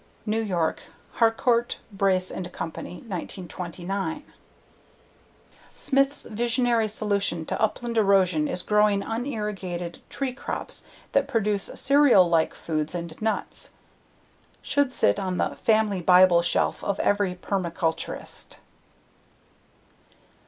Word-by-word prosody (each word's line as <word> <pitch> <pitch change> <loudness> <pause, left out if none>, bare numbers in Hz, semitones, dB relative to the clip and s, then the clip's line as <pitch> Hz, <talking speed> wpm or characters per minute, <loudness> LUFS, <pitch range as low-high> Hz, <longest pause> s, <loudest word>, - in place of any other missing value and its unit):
New 220 +1 0
York: 175 -7 -1 0.4
Harcourt, 235 +1 +2
Brace 190 -2 +1
and 180 -1 -5
Company, 165 0 -6
1929. 185 - -5 1.5
Smith's 275 +1 +1
visionary 235 0 +1
solution 200 -6 -1
to - - -3
upland 230 +1 0
erosion 185 -7 +3
is 180 - -2
growing 210 -1 +3
unirrigated 210 -8 -4
tree 270 -2 -3
crops 260 - -4 0.3
that - - +2
produce 210 -3 +1
cereal 275 -9 +5
like 165 -1 +2
foods 155 0 -3
and 170 0 -6
nuts. 220 0 -3 0.9
Should 285 -2 +1
sit 100 - +2
on 185 -1 -2
the - - -1
"family 215 -4 +1
bible 180 0 +6
shelf" 175 - 0
of 200 - -1
every 205 -3 +1
permaculturalist. 175 -3 -3
200 Hz, 105 wpm, -25 LUFS, 180-225 Hz, 1.5 s, bible